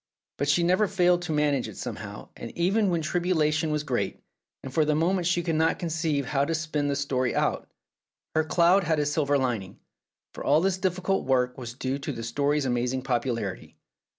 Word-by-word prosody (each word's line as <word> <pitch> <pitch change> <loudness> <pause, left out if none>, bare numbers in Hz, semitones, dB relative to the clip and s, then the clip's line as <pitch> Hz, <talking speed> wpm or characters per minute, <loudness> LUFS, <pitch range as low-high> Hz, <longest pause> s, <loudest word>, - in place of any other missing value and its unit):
But 140 +1 0
she 170 +4 +3
never 185 +5 +3
failed 180 -2 +3
to 175 -2 -4
manage 150 -3 +1
it - - -10
somehow, - - -7
and 115 - -7
even 195 +4 +2
when 170 -2 0
tribulation 160 -2 +1
was 150 -1 -1
great, 130 -5 -2 0.4
and 135 - -7
for 160 - +3
the 150 0 +1
moment 175 +2 +1
she 175 -1 +1
could 165 - -1
not 160 +1 +2
conceive 160 -4 -1
how 140 +2 +1
to 165 +3 0
spin 155 -2 -1
the 140 - 0
story 135 -3 -1
out, - - 0 0.6
her 160 - +2
cloud 175 +4 +4
had 160 -1 +1
a 150 - +1
silver 145 -1 +1
lining, 120 -8 -2 0.5
for - - -7
all 145 +2 +4
this 185 +1 0
difficult 185 +1 0
work 125 -1 +2
was 120 -2 -7
due 135 +1 -2
to 140 - -4
the 115 - -6
story's 145 +5 0
amazing 125 +1 -1
popularity. 120 -6 -2
150 Hz, 195 wpm, -27 LUFS, 135-170 Hz, 0.6 s, cloud